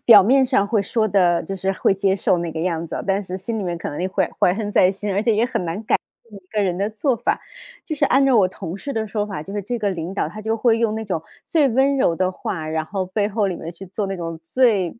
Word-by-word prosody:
表 215 -4 +10
面 260 +7 +4
上 225 -6 +2
会 215 -1 +1
说 215 +2 0
得 180 -4 +3
就 195 +4 -5
是 190 +1 -1
会 195 - +2
接 195 0 +1
受 180 -2 +2
那 170 -1 -3
个 160 - -5
样 170 -1 -1
子 - - -6
哦， - - -4
但 195 +1 +1
是 185 -1 -5
心 220 +4 -4
里 - - -2
面 175 -2 -2
可 - - -5
能 145 - -5
也 185 - 0
会 190 -1 +1
怀 180 - +4
恨 210 -1 -3
在 185 -1 +5
心， 200 +1 -4
而 200 - +1
且 225 -1 +2
也 220 - +3
很 245 -6 -2
难 165 +2 -2
改 - - +1 0.3
变 220 - -24
一 - - -33
个 210 +1 -1
人 180 -2 0
的 200 +2 0
做 220 +5 0
法。 - - 0 0.5
就 315 - -3
是 285 -1 +2
按 270 +2 +4
照 265 -2 +4
我 195 -5 +5
同 185 -2 -7
事 280 +5 -5
的 220 -1 -1
说 210 0 -2
法， 195 -7 -5
就 195 - -9
是 205 - -2
这 235 +5 -3
个 205 -2 0
领 175 +1 -4
导 195 - 0
他 215 +7 -8
就 220 +1 -1
会 230 0 +3
用 225 -2 +1
那 220 0 -4
种 180 -6 -2 0.2
最 305 -5 +3
温 270 +3 +2
柔 170 -9 +2
的 185 0 0
话， 165 -4 -4
然 160 0 -1
后 195 -2 -2
背 200 +3 -1
后 210 -1 0
里 185 - -1
面 165 - -6
去 175 +3 -10
做 195 +2 -3
那 195 0 -3
种 165 -1 -5
最 205 -3 +2
200 Hz, 320 characters per minute, -21 LUFS, 180-220 Hz, 0.5 s, 表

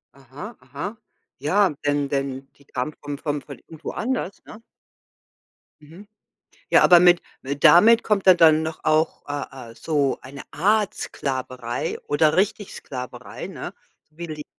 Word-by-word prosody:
Aha, 140 - -10
aha. 205 +4 -6 0.4
Ja, 185 +5 +2
denn 145 -1 +1
denn, 135 -1 -3
die 140 - -23
kamen 135 +4 -4
vom 145 -1 -5
vom 145 0 -3
von 140 -1 -11
irgendwo 160 -1 -10
anders, 230 -5 -3
ne? 220 - -12 1.2
Mhm. 170 +8 -14 0.6
Ja, - - +6
aber 175 -1 +8
mit 175 0 +5 0.4
damit 225 +10 +7
kommt 200 -3 0
dann 165 -4 +6
doch 160 0 -5
auch, 155 +1 +1
äh 135 -4 -6
äh, - - -16
so 140 +2 0
eine 135 +1 -10
Art 205 +4 +2
Sklaverei 130 -3 -4
oder 150 +1 +3
richtig 205 +1 0
Sklaverei, 125 -1 -8
ne, - - -7 0.4
wie 170 +3 -8
die 150 -2 -7
155 Hz, 140 wpm, -23 LUFS, 140-185 Hz, 1.2 s, aber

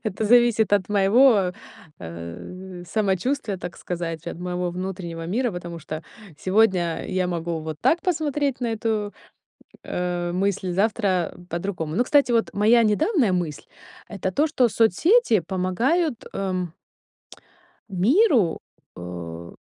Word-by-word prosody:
Это 215 -1 -2
зависит 235 -2 +4
от 200 -1 0
моего, 205 -1 +4 0.5
э, 90 - -8
самочувствия, 210 +4 -1
так 180 -1 -8
сказать, 170 -2 -5
от - - -5
моего 180 0 -2
внутреннего 175 -2 -5
мира, 240 +6 0
потому 175 -2 -7
что 155 0 -6 0.4
сегодня, 185 -3 +2
я 185 -1 0
могу 170 -1 -3
вот 155 -1 -6
так 340 - +3
посмотреть 295 -6 -1
на 245 - -1
эту, 220 -2 -2 0.7
э, 175 -1 -2
мысль, 190 0 -1
завтра 195 -3 +1
по-другому. 170 -2 -3
Ну, 245 - +3
кстати, 285 -1 +3
вот 230 -1 +2
моя 220 +4 +4
недавняя 235 - +2
мысль 170 -5 -2 0.4
это 195 -2 -3
то, 290 +11 +2
что 260 -6 +2
соцсети 230 - +3
помогают, 225 - 0
эм 185 -3 -2 1.1
миру, 225 - +3 0.4
э, 85 -1 -7
190 Hz, 120 wpm, -24 LUFS, 175-230 Hz, 1.1 s, зависит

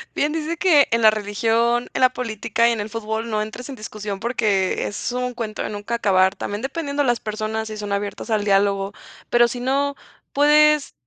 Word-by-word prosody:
Bien 295 +1 +1
dice 325 +1 -3
que 315 -7 +5
en 230 0 +2
la 215 - +8
religión, 225 +3 0
en - - -2
la 255 - +6
política 230 -1 -1
y 235 - +3
en 230 - -2
el 205 +1 -4
fútbol 220 +1 -4
no 215 -1 0
entres 230 +5 -7
en 275 - -6
discusión, 210 -3 -6
porque 215 -5 0
es 205 - -4
un 250 0 -2
cuento 220 -3 -5
de - - -3
nunca 210 +3 -4
acabar. 190 -4 +3
También 205 +2 -5
dependiendo 285 +1 -2
las 240 -3 +1
personas, 215 +1 -3
si 215 -1 -7
son 205 -1 -5
abiertas 200 +3 -3
al 210 -1 +1
diálogo, 200 0 +1 0.4
pero 240 0 +5
si 245 +1 -5
no 280 +3 0 0.4
puedes 300 0 +4
225 Hz, 200 wpm, -22 LUFS, 210-255 Hz, 0.4 s, la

